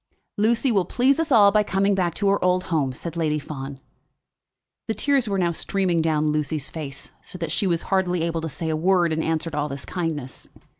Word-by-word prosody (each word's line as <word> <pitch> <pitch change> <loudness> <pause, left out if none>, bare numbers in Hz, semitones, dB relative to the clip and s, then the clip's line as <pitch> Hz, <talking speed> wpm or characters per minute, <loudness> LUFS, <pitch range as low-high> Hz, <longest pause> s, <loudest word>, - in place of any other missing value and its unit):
"Lucy 235 +5 +2
will 195 -4 +3
please 265 - +2
us 325 -3 -1
all 205 -5 +7
by 210 +1 +4
coming 195 0 +1
back 180 -4 0
to 200 - 0
her 200 0 +2
old 180 0 +2
home," 140 -5 +1
said 165 +6 -7
Lady 155 -2 0
Fawn. 140 -2 -7 1.1
The 220 - -1
tears 275 -5 +1
were 200 - 0
now 175 -2 +1
streaming 180 0 0
down 155 -1 +1
Lucy's 150 -1 -2
face, 140 -4 -7
so - - -9
that 165 -3 -4
she 195 - +1
was 170 -2 0
hardly 180 -3 0
able 165 -1 -1
to 160 - -4
say 160 +2 -4
a 160 - 0
word 175 0 +2
in 160 - -1
answer 160 +1 -1
to 150 - -5
all 150 0 -1
this 140 0 -6
kindness. 155 -7 -4
170 Hz, 215 wpm, -23 LUFS, 155-195 Hz, 1.1 s, all